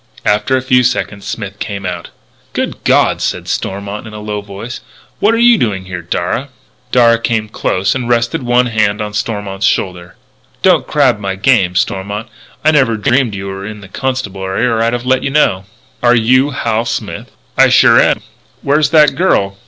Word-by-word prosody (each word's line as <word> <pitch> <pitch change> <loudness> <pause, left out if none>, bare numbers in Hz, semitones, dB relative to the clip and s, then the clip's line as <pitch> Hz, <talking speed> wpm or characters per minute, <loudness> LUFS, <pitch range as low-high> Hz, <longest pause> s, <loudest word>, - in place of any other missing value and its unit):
After 105 +6 +2
a 130 - -3
few 130 -1 +3
seconds 120 -5 -2
Smith 100 -3 -6
came 100 -2 -5
out. 90 -1 -5 0.4
"Good - - -3
God!" - - +2
said - - -2
Stormont 100 +3 -4
in 110 - -10
a - - -7
low 105 -1 -4
voice. 100 +5 -8 0.4
"What 210 - +3
are - - 0
you 235 -2 +5
doing 95 -5 -1
here, 90 -1 -6
Darragh?" 85 +10 -2 0.4
Darragh 115 -2 +4
came 110 -2 0
close 95 -2 -1
and 125 -2 -3
rested 120 +1 +1
one 125 0 +2
hand 110 -3 0
on 105 -1 -4
Stormont's 105 -2 -2
shoulder: 90 -2 -2 0.5
"Don't - - +3
crab 105 - +2
my 95 -2 -3
game, 95 -4 +2
Stormont. 100 +4 -2 0.4
I 155 - +6
never 130 -7 +2
dreamed 125 -1 +1
you 100 0 -6
were 95 0 -6
in 105 0 -7
the 95 - -11
Constabulary 100 -4 -2
or 115 -2 +1
I'd 115 +1 +1
have 120 0 -3
let 130 0 +2
you - - -2
know." 100 -10 +1 0.4
"Are 120 0 +4
you 130 +4 +3
Hal 115 -4 -1
Smith?" - - -4 0.3
"I - - +5
sure - - +6
am. - - +1 0.4
Where's 145 +1 +2
that 150 -2 +5
girl?" 100 - +1
110 Hz, 185 wpm, -14 LUFS, 100-125 Hz, 0.5 s, I